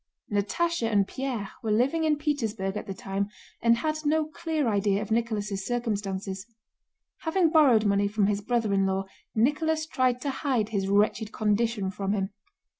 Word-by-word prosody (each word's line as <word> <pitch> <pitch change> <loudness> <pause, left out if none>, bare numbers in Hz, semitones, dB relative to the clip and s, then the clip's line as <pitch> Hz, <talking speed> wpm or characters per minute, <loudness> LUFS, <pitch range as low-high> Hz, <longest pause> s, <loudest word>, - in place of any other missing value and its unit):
Natásha 230 +8 0
and 200 -2 +3
Pierre 245 -5 -4
were 225 - -3
living 265 +10 +2
in 305 -1 +3
Petersburg 225 -10 -1
at 210 - -5
the 195 - -3
time 195 +1 -3 0.3
and 230 0 +4
had 310 +5 -1
no 310 +1 +2
clear 315 -2 -2
idea 200 -2 +2
of 215 0 -5
Nicholas' 215 -4 -1
circumstances. 200 -4 -3 0.7
Having 330 0 +2
borrowed 265 -9 +5
money 200 0 +3
from 205 0 +1
his 205 0 0
brother 225 -1 0
in 195 0 +3
law, 190 0 -1 0.3
Nicholas 310 +7 +2
tried 255 -5 +1
to 280 - -1
hide 260 -6 0
his 195 -3 -1
wretched 210 +2 +2
condition 215 -2 0
from 195 +1 -2
him. 195 -1 -1
220 Hz, 165 wpm, -27 LUFS, 200-275 Hz, 0.7 s, borrowed